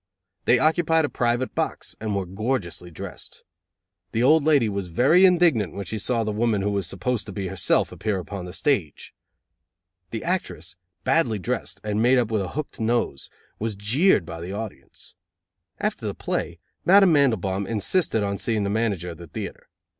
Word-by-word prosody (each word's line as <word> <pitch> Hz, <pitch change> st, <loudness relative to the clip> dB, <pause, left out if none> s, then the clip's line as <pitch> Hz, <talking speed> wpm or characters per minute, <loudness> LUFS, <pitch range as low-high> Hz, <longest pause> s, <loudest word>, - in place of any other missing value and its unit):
They 120 Hz, -, +5 dB
occupied 160 Hz, +1 st, +3 dB
a -, -, -3 dB
private 120 Hz, +1 st, 0 dB
box, -, -, -3 dB
and 110 Hz, -2 st, -2 dB
were 100 Hz, -1 st, -1 dB
gorgeously 95 Hz, -, -3 dB
dressed. 80 Hz, -, -9 dB, 0.7 s
The 115 Hz, -, +1 dB
old 155 Hz, +3 st, +5 dB
lady 145 Hz, -6 st, +4 dB
was 100 Hz, -3 st, -3 dB
very 140 Hz, -, +5 dB
indignant 165 Hz, -, +3 dB
when 100 Hz, -, -4 dB
she 110 Hz, +5 st, -4 dB
saw 115 Hz, +2 st, 0 dB
the 110 Hz, -, -2 dB
woman 105 Hz, -2 st, +1 dB
who 105 Hz, -, 0 dB
was 100 Hz, -4 st, -1 dB
supposed 105 Hz, +6 st, -2 dB
to -, -, -6 dB
be 95 Hz, -1 st, -4 dB
herself 95 Hz, -2 st, +1 dB
appear 100 Hz, -4 st, -2 dB
on 100 Hz, -3 st, -4 dB
the 90 Hz, -, -7 dB
stage. 95 Hz, -, -1 dB, 1.0 s
The 115 Hz, -, -5 dB
actress, 105 Hz, -, -3 dB, 0.3 s
badly 125 Hz, -10 st, +2 dB
dressed, 90 Hz, -, -4 dB
and 105 Hz, 0 st, -1 dB
made 125 Hz, +3 st, +5 dB
up 120 Hz, -3 st, +1 dB
with 110 Hz, -2 st, +1 dB
a 95 Hz, -, -3 dB
hooked 150 Hz, -3 st, -5 dB
nose, 115 Hz, -, -1 dB, 0.3 s
was 110 Hz, -1 st, -2 dB
jeered 110 Hz, -, +3 dB
by 85 Hz, 0 st, -7 dB
the 90 Hz, +3 st, -5 dB
audience. 110 Hz, 0 st, -8 dB, 0.7 s
After -, -, -2 dB
the -, -, -3 dB
play, -, -, -3 dB, 0.3 s
Madame 195 Hz, -1 st, +6 dB
Mandelbaum 100 Hz, -, +2 dB
insisted 115 Hz, -, +1 dB
on 100 Hz, -1 st, -2 dB
seeing 110 Hz, -3 st, 0 dB
the 100 Hz, -, -1 dB
manager 100 Hz, -6 st, -1 dB
of 85 Hz, -, -11 dB
the 85 Hz, -, -10 dB
theatre. -, -, -7 dB
110 Hz, 175 wpm, -24 LUFS, 95-130 Hz, 1.0 s, Madame